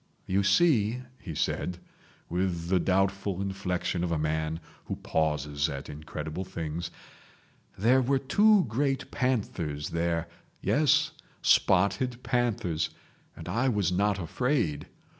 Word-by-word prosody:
"You 95 +2 +2
see," 115 - +3 0.2
he 80 -5 -7
said, 90 +4 -1 0.5
with 85 -1 -1
the 95 -1 +4
doubtful 95 +1 +1
inflection 95 -2 -2
of 85 - -1
a 85 - +1
man 80 +1 -1 0.3
who - - -3
pauses 75 -1 0
at 70 0 -6
incredible 75 +3 -5
things, 85 -3 -4 0.9
"there 125 +7 +4
were 135 +2 +2
two 205 +9 +4
great 135 +4 -1
panthers 90 - -1
there... 85 0 0 0.3
Yes, 150 0 +3 0.3
spotted 100 +7 +3
panthers. 115 -10 0 0.5
And - - -8
I 120 +9 +1
was 105 -7 +1
not 100 +2 +2
afraid. 100 - -1
95 Hz, 120 wpm, -28 LUFS, 80-120 Hz, 0.9 s, the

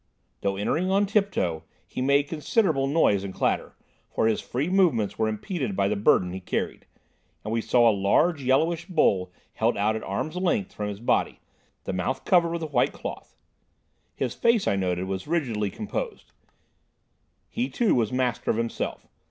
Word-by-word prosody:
Though 100 -1 0
entering 160 - 0
on 200 +2 +3
tiptoe, 195 - 0 0.2
he - - -6
made 140 +2 +3
considerable 155 -2 +1
noise 135 -10 +3
and 95 -1 -6
clatter, - - -1 0.3
for - - 0
his 110 -1 +1
free 135 +5 -2
movements 170 - +2
were 110 - +2
impeded 110 - -3
by 100 0 +2
the 105 - 0
burden 95 -3 +3
he 95 - -4
carried, 90 - -3 0.6
and 110 - -2
we 115 - +1
saw 120 +1 +4
a 115 - +5
large 140 - +2
yellowish 160 +6 +1
bowl 100 - +2 0.2
held - - +1
out 105 +2 +1
at 110 - -3
arms' 125 - -3
length 175 - 0
from 105 -1 -3
his 100 -1 -6
body, 120 - 0 0.4
the - - -4
mouth 95 +9 -2
covered 175 -2 +4
with 170 0 -3
a 155 -2 -6
white 125 - +2
cloth. - - -8 0.8
His 130 -3 -2
face, 235 -3 +2
I - - +2
noted, 90 -2 -1
was 95 +3 -4
rigidly 120 -11 0
composed. 330 - -5 1.2
He, 245 +3 -2
too, 235 -3 +2
was 115 -4 +1
master 125 -1 -1
of - - +2
himself. 115 0 -3
125 Hz, 175 wpm, -26 LUFS, 100-170 Hz, 1.2 s, a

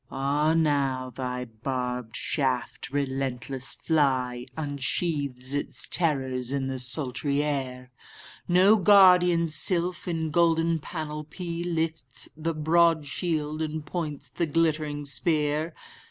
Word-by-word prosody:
—Ah 145 +4 +1
now 140 -5 +1
thy 125 0 -4
barbed 125 0 -4
shaft, 130 -4 -2
relentless 135 -2 -3
fly, 130 -5 0
Unsheaths 140 -2 -2
its 145 - -2
terrors 130 -6 0
in 140 -1 -1
the 130 -1 -3
sultry 140 +2 0
air! 130 -3 -3 0.6
No 185 +5 +5
guardian 180 -4 +6
sylph, 170 +4 0
in 160 -2 -2
golden 165 0 +2
panoply, 155 +2 -5
Lifts 160 -6 -2
the 160 +1 -2
broad 160 0 +3
shield, 155 0 -2
and 155 -1 -3
points 150 -3 -5
the 170 - -1
glittering 155 -2 0
spear. 150 +2 +1
150 Hz, 110 wpm, -27 LUFS, 130-165 Hz, 0.6 s, guardian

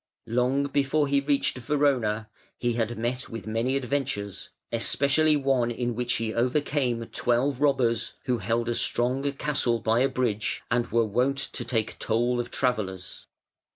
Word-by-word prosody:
Long 125 +4 +1
before 140 +1 +1
he 140 0 +3
reached 140 -2 0
Verona 125 -6 +1 0.3
he 120 -1 0
had 115 0 -1
met 120 +3 -2
with 115 - -7
many 115 +4 0
adventures, 130 -7 -2 0.2
especially 140 +6 +3
one 135 -4 +1
in 120 0 -2
which 120 +1 -1
he 110 -1 -1
overcame 125 -1 0
twelve 125 +3 0
robbers 130 -5 +2
who 125 -3 0
held 115 +3 -1
a 120 - +1
strong 130 +4 +1
castle 135 -4 +1
by 115 +1 +1
a 135 +2 +3
bridge 110 -5 -1
and 120 0 +2
were 115 0 +3
wont 125 +6 +1
to 135 -2 -3
take 115 -2 -2
toll 120 +2 +1
of 120 - -3
travellers. 95 -8 -2
125 Hz, 155 wpm, -26 LUFS, 115-135 Hz, 0.3 s, he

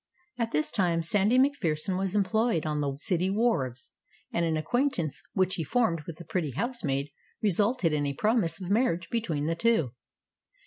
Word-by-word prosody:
At 230 -1 0
this 150 -5 0
time 170 -4 +1
Sandy 205 +8 +3
MacPherson 200 - +1
was 190 +1 -2
employed 210 -3 +1
on 150 -1 -1
the 140 -1 -1
city 180 +3 0
wharves, 190 - -1 0.4
and 170 - +1
an 160 -1 +1
acquaintance 175 - 0
which 185 -2 +1
he 165 - -2
formed 170 - +1
with 165 -2 -7
the 170 - -10
pretty 155 -5 -2
housemaid 145 - -2 0.3
resulted 205 -3 +2
in 145 -1 0
a 140 - -3
promise 210 - +1
of 185 0 -5
marriage 200 -7 +1
between 170 -11 -1
the 165 - +1
two. 165 - +2
175 Hz, 170 wpm, -28 LUFS, 155-220 Hz, 0.4 s, Sandy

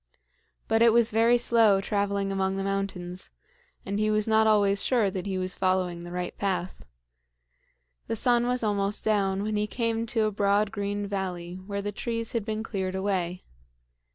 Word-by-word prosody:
But 225 0 +2
it 230 -1 +6
was 235 -1 +3
very 230 +2 +4
slow 225 -4 +4
traveling 200 -1 -1
among 190 0 -1
the 195 - -2
mountains, 195 -2 -3 0.6
and 200 +1 -2
he 215 0 +2
was 215 0 +1
not 220 0 +4
always 205 -2 +3
sure 230 -7 +2
that 185 +1 -4
he 190 -1 -2
was 185 0 -2
following 185 -2 0
the 175 - -8
right 180 0 -4
path. 185 -2 -2 1.2
The - - -1
sun 240 +1 +2
was 250 -1 0
almost 205 -1 0
down 200 -2 +1
when 215 0 -1
he 210 0 0
came 230 0 -1
to 225 -1 +1
a 215 - 0
broad 200 +1 +1
green 205 -1 -3
valley 185 -3 -4
where 200 -1 -3
the 205 - -2
trees 230 +2 -3
had 230 -3 -1
been 220 +1 -3
cleared 190 -4 -3
away. 185 -2 -2
200 Hz, 180 wpm, -27 LUFS, 190-220 Hz, 1.2 s, it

